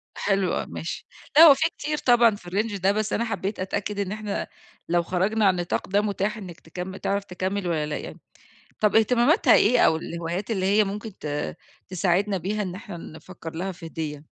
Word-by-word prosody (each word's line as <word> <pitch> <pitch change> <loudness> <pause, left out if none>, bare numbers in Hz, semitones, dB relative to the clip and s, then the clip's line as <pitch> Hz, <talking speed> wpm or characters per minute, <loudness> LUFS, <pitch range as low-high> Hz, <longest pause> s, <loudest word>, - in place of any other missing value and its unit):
حلو 195 -2 0
آه - - -1
ماشي. 165 - -6 0.3
لأ 325 - +11
هو 300 -4 +11
في 320 +4 +1
كتير 300 0 -2
طبعًا 240 -5 +4
في 175 -3 -11
الRange 205 +1 -1
ده، 195 - +4
بس 215 +1 -1
أنا 230 - 0
حبّيت 210 -3 -3
أتأكد 200 +2 -3
إن 195 -2 -2
إحنا 210 -1 -3 0.4
لو 175 0 +2
خرجنا 195 +5 +1
عن 190 - +5
النطاق 175 -1 -2
ده 200 +2 +3
متاح 210 +1 -1
إنّك 180 -5 -9
تكم 180 +3 -7
تعرف 200 0 -1
تكمّل 190 0 -3
والّا 155 -3 0
لأ 150 - -3
يعني؟ - - -8 0.6
طب 210 -1 +2
اهتماماتها 245 - +4
إيه 250 - +4
أو 160 - +5
الهوايات 170 +6 -4
اللي 190 -3 0
هي 205 +2 +4
ممكن 210 +2 -5
ت 150 -1 -3 0.3
تساعدنا 190 +2 +1
بيها 205 +5 -2
إن 185 -3 -4
إحنا 185 -3 -8
نفكّر 165 0 -10
لها 190 +3 -3
في 170 -1 -11
هدية؟ 155 -2 -5
195 Hz, 195 wpm, -25 LUFS, 175-215 Hz, 0.6 s, لأ